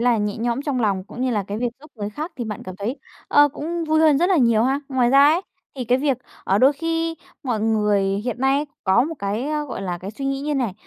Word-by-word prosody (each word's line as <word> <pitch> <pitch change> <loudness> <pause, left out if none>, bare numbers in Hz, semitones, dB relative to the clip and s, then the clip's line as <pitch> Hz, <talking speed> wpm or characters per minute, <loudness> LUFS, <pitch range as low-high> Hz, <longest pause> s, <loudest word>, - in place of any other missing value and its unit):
là 240 -1 +3
nhẹ 210 0 -1
nhõm 235 +4 -1
trong 275 -4 -1
lòng, 195 -4 0
cũng 240 - -10
như 255 - +1
là 210 -3 0
cái 205 +2 -3
việc 245 - 0
giúp 305 - -15
người 205 -2 -4
khác 310 - -6
thì 240 - -3
bạn 210 -2 -5
cảm 185 0 -8
thấy, 230 +8 -3 0.3
ờ, 290 0 +6
cũng 330 +4 -4
vui 315 0 +2
hơn 310 -3 +5
rất 350 +4 +3
là 375 - +4
nhiều 235 -5 +4
ha. 270 +3 +1
Ngoài 255 -3 +2
ra 275 +1 +7
ấy, 325 +4 +4 0.4
thì 255 - -3
cái 245 +2 +2
việc, 275 -1 +1 0.3
ờ, 195 +2 +2
đôi 265 +3 +6
khi 330 +2 -2 0.3
mọi 240 -6 -1
người 210 -2 +2 0.2
hiện 245 -1 -3
nay 270 0 +3
ấy 295 - -1 0.2
có 195 +6 +4
một 325 +3 -4
cái, 205 +3 -2
a, 300 -1 -1
gọi 255 -8 -6
là, 180 -2 -3
cái 190 +3 -7
suy 275 +6 -7
nghĩ 275 0 -1
như 295 +1 -2
này, 250 -7 0
255 Hz, 275 wpm, -22 LUFS, 215-290 Hz, 0.4 s, ra